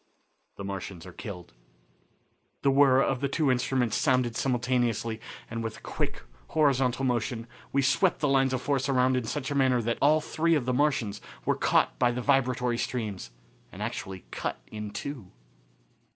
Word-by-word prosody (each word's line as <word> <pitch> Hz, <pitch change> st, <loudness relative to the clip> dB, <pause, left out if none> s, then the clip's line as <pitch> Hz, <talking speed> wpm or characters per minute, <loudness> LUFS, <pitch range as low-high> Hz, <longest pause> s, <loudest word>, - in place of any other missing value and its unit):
The 100 Hz, -, -7 dB
Martians 95 Hz, -3 st, -6 dB
Are 90 Hz, -, -10 dB
Killed. 90 Hz, -, -8 dB, 1.1 s
The 140 Hz, -, +4 dB
whirr 135 Hz, -1 st, +5 dB
of 130 Hz, -2 st, 0 dB
the 140 Hz, -, +1 dB
two 140 Hz, 0 st, +1 dB
instruments 125 Hz, -2 st, +1 dB
sounded 125 Hz, -5 st, +2 dB
simultaneously, 120 Hz, -3 st, 0 dB, 0.3 s
and 115 Hz, 0 st, -4 dB
with 115 Hz, -, -4 dB
a -, -, -15 dB
quick, -, -, -4 dB, 0.2 s
horizontal 135 Hz, -4 st, +2 dB
motion 120 Hz, -2 st, -1 dB, 0.3 s
we 140 Hz, 0 st, +2 dB
swept 175 Hz, +7 st, +3 dB
the 150 Hz, -, +1 dB
lines 135 Hz, -1 st, +3 dB
of 130 Hz, -1 st, -2 dB
force 140 Hz, -2 st, 0 dB
around 130 Hz, -1 st, +3 dB
in 125 Hz, -2 st, -1 dB
such 140 Hz, +4 st, -3 dB
a -, -, -1 dB
manner 130 Hz, -2 st, +3 dB
that 115 Hz, +1 st, -1 dB
all 150 Hz, +2 st, +5 dB
three 165 Hz, +2 st, +1 dB
of 140 Hz, -6 st, 0 dB
the 125 Hz, -, 0 dB
Martians 125 Hz, -7 st, +1 dB, 0.2 s
were -, -, +3 dB
caught -, -, +2 dB
by 120 Hz, -, +4 dB
the 120 Hz, +1 st, -2 dB
vibratory 125 Hz, -2 st, +1 dB
streams 105 Hz, -, -3 dB, 0.4 s
and -, -, -6 dB
actually 95 Hz, -1 st, -5 dB
cut -, -, -3 dB
in 105 Hz, -1 st, -5 dB
two. 125 Hz, -4 st, -6 dB
125 Hz, 170 wpm, -28 LUFS, 115-135 Hz, 1.1 s, whirr